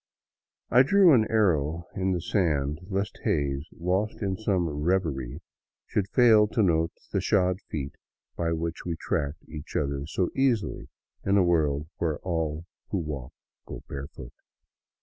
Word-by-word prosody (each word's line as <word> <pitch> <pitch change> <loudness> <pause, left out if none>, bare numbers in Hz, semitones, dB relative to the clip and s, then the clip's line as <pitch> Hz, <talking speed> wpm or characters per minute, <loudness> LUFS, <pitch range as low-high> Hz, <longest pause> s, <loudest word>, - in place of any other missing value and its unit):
I 125 - +7
drew 185 +4 +6
an 110 -4 +4
arrow 85 -7 +2
in 95 0 0
the 90 -2 -1
sand 75 -7 0
lest 100 +1 -2
Hays, 70 - 0
lost 95 +5 0
in 95 -1 0
some 95 -4 0
reverie, 75 -3 -1 0.4
should 100 -2 -1
fail 110 -4 +6
to 110 +1 +1
note 80 -2 +2 0.2
the - - 0
shod 90 0 +2
feet 70 -3 -4 0.4
by 85 -1 -1
which 80 0 -3
we 85 -2 -2
tracked 75 -1 -3
each 75 -2 -9
other 70 -1 -1
so 90 +3 0
easily 130 -5 0 0.3
in 100 +1 +3
a 95 - +5
world 75 -4 +1
where 80 -3 -1
all 80 -2 -2 0.2
who 100 - -1
walk 75 -7 -5 0.3
go - - -8
barefoot. 70 -3 -8
85 Hz, 150 wpm, -27 LUFS, 75-100 Hz, 0.4 s, I